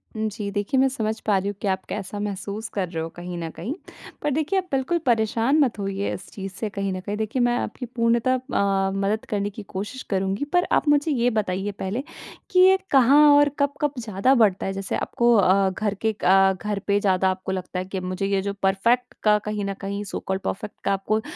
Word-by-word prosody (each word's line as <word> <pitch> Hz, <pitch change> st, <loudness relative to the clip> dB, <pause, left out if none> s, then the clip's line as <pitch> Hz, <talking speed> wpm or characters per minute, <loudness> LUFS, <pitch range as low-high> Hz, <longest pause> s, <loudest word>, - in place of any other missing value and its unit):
उम, 220 Hz, 0 st, -1 dB
जी 205 Hz, -1 st, -5 dB
देखिए, 205 Hz, +6 st, 0 dB
मैं 270 Hz, -, +5 dB
समझ 220 Hz, -3 st, -2 dB
पा 205 Hz, -2 st, +3 dB
रही 195 Hz, +1 st, -2 dB
हूँ 205 Hz, -, -3 dB
कि 205 Hz, -, -2 dB
आप 190 Hz, 0 st, 0 dB
कैसा 205 Hz, 0 st, -4 dB
महसूस 205 Hz, +2 st, -4 dB
कर 190 Hz, -3 st, -1 dB
रहे 165 Hz, -2 st, -3 dB
हो 165 Hz, -, -5 dB
कहीं 175 Hz, 0 st, -6 dB
न 165 Hz, -1 st, -4 dB
कहीं, 220 Hz, -, -4 dB, 0.5 s
पर 295 Hz, -, 0 dB
देखिए 315 Hz, +7 st, +1 dB
आप 370 Hz, -, -5 dB
बिल्कुल 270 Hz, +6 st, +1 dB
परेशान 230 Hz, +4 st, +2 dB
मत 255 Hz, -7 st, +2 dB
होइए 195 Hz, 0 st, -2 dB
इस -, -, -8 dB
चीज़ 195 Hz, -1 st, -6 dB
से 210 Hz, +3 st, -4 dB
कहीं 195 Hz, -1 st, -3 dB
न 185 Hz, -, -3 dB
कहीं, 205 Hz, +2 st, -4 dB
देखिए 220 Hz, +4 st, -1 dB
मैं 240 Hz, 0 st, +2 dB
आपकी 250 Hz, -, -4 dB
पूर्णतः 235 Hz, +1 st, +1 dB
अ, 200 Hz, -7 st, 0 dB
मदद 200 Hz, +3 st, -1 dB
करने 205 Hz, -1 st, -1 dB
की 210 Hz, +1 st, -9 dB
कोशिश 205 Hz, +7 st, -5 dB
करूँगी। 195 Hz, +5 st, -1 dB
पर 355 Hz, 0 st, +3 dB
आप -, -, +2 dB
मुझे 295 Hz, +1 st, +3 dB
ये 245 Hz, -2 st, +2 dB
बताइए 205 Hz, -2 st, -1 dB
पहले 200 Hz, +6 st, -4 dB, 0.5 s
कि 365 Hz, -, +4 dB
ये 380 Hz, +1 st, +7 dB
कहाँ 270 Hz, +2 st, +6 dB, 0.2 s
और 290 Hz, 0 st, +5 dB
कब-कब 285 Hz, +1 st, 0 dB
ज़्यादा 220 Hz, +3 st, +1 dB
बढ़ता 210 Hz, -5 st, +3 dB
है? 195 Hz, -, -2 dB
जैसे 195 Hz, 0 st, -3 dB
आपको 235 Hz, 0 st, +2 dB
अ, 195 Hz, 0 st, +4 dB
घर 205 Hz, +1 st, -2 dB
के 220 Hz, -, +4 dB
अ, 190 Hz, +1 st, +5 dB
घर 205 Hz, +2 st, -3 dB
पे 200 Hz, 0 st, +3 dB
ज़्यादा 190 Hz, -1 st, +2 dB
आपको 185 Hz, 0 st, -3 dB
लगता 185 Hz, -1 st, -4 dB
है 185 Hz, -, -3 dB
कि 190 Hz, 0 st, -4 dB
मुझे 185 Hz, +2 st, -3 dB
ये 195 Hz, -1 st, +1 dB
जो 200 Hz, 0 st, -3 dB
परफेक्ट 235 Hz, +6 st, +2 dB
का 210 Hz, -1 st, +5 dB
कहीं 210 Hz, -1 st, -2 dB
न 200 Hz, -, -2 dB
कहीं 200 Hz, +1 st, -3 dB
सो 200 Hz, -, -5 dB
कॉल्ड 190 Hz, 0 st, -3 dB
परफेक्ट 210 Hz, +2 st, -4 dB
का 200 Hz, -, +1 dB
आपको 215 Hz, +3 st, 0 dB
205 Hz, 230 wpm, -24 LUFS, 195-240 Hz, 0.5 s, ये